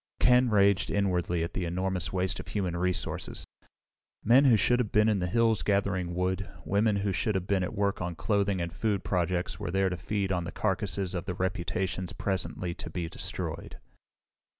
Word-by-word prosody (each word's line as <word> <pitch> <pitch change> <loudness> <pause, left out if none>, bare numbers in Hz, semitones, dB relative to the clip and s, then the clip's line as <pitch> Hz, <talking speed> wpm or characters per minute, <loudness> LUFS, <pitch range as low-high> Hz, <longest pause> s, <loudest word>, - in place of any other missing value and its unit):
Ken 125 0 +5
raged 100 -3 +3
inwardly 90 -4 0
at 85 - -4
the 90 - -2
enormous 90 0 -1
waste 95 0 -1
of - - -8
human 95 -4 -2
resources. 90 +1 -2 0.8
Men 125 +6 +6
who 120 -5 +6
should 120 +5 +3
have 115 -4 -1
been 105 +1 +4
in 105 -3 +2
the 90 - -1
hills 115 +2 +2
gathering 95 -3 0
wood, 95 +2 -1 0.2
women 105 +2 +2
who 100 0 0
should 95 +4 0
have 95 -1 -1
been 100 -1 +1
at 90 - -3
work 100 -1 0
on 90 -1 -3
clothing 100 0 0
and 85 -1 -3
food 105 -4 -1
projects 90 +1 -1
were - - -3
there 95 +1 +2
to 90 - -3
feed 100 +3 -2
on 90 -2 0
the 85 - -5
carcasses 95 -2 -1
of 90 -1 -4
the 90 - -2
reputations 95 0 -2
presently 95 -2 -2
to 85 - -8
be 85 0 -3
destroyed. - - -3
95 Hz, 190 wpm, -29 LUFS, 90-100 Hz, 0.8 s, Men